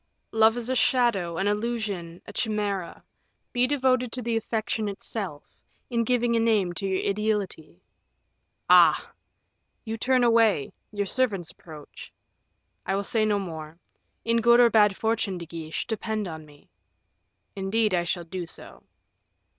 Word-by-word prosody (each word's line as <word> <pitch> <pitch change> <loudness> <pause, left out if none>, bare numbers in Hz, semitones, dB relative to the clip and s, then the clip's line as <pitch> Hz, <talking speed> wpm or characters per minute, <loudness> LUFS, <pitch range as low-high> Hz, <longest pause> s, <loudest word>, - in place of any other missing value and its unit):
"Love 225 +1 +4
is 240 -1 -4
a 260 - 0
shadow, 225 -9 +2
an 195 - 0
illusion, 205 -6 -3
a 205 - -10
chimera; 205 -5 -2 0.5
be 245 +1 +3
devoted 255 -3 +1
to 250 - -2
the 235 -1 -2
affection 220 -1 -2
itself, 195 -5 -5 0.5
in 235 -1 +1
giving 240 0 +1
a - - +3
name 215 -6 +2
to 195 +2 -3
your 190 -1 -1
ideality." 205 -5 -2 0.8
"Ah!" - - +5 0.7
"You 225 0 -4
turn 255 +1 +2
away; 225 - +3 0.2
your 205 -1 -2
servants 200 -6 0
approach. 155 -3 -12 0.7
I 195 - -1
will 200 - -1
say 215 +2 +2
no 210 -1 +2
more. 160 -4 -6 0.5
In 230 0 +2
good 235 +1 +5
or 240 -1 +6
bad 210 -2 +5
fortune, 220 -4 -1
De 170 - -7
Guiche, 160 -1 -5
depend 220 -2 -3
on 160 -2 -8
me." 145 -1 -20 0.8
"Indeed 200 +2 0
I 175 -1 +2
shall 175 0 -2
do 175 +1 -5
so." - - -12
210 Hz, 145 wpm, -26 LUFS, 185-230 Hz, 0.8 s, or